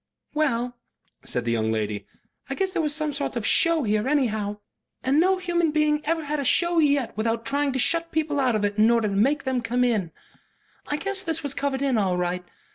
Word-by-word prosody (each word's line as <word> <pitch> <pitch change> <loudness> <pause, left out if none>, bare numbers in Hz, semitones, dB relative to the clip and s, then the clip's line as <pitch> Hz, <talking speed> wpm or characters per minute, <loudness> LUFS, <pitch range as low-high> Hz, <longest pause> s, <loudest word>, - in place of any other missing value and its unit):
"Well," 245 -5 -1 0.4
said 125 -1 -2
the 120 - 0
young 110 -1 0
lady, 105 -2 -3 0.4
"I 270 - -2
guess 380 +3 -1
there 365 -3 0
was 300 -2 -1
some 305 -2 -1
sort 280 -2 -3
of 230 -3 -2
show 330 +3 +4
here 215 +2 0
anyhow. 215 -8 0 0.5
And 270 +3 +2
no 375 +3 +3
human 345 -2 0
being 300 0 +1
ever 325 0 -1
had 300 +1 -2
a - - -1
show 345 +5 +3
yet 285 -5 +2
without 225 +1 -1
trying 280 +3 +1
to - - -1
shut 330 +5 +1
people 305 -2 0
out 255 -4 +2
of 210 -1 +1
it 205 +1 -2
in 220 +2 +6
order 230 -2 +3
to - - -3
make 270 +10 +2
them 260 -2 -1
come 245 +2 0
in. 215 -9 0 0.8
I 295 - -1
guess 395 +4 -1
this 325 -3 -1
was 285 -2 -1
covered 280 -1 -2
in 260 -5 +2
all 185 -3 +1
right. 180 0 -2
275 Hz, 220 wpm, -24 LUFS, 220-305 Hz, 0.8 s, in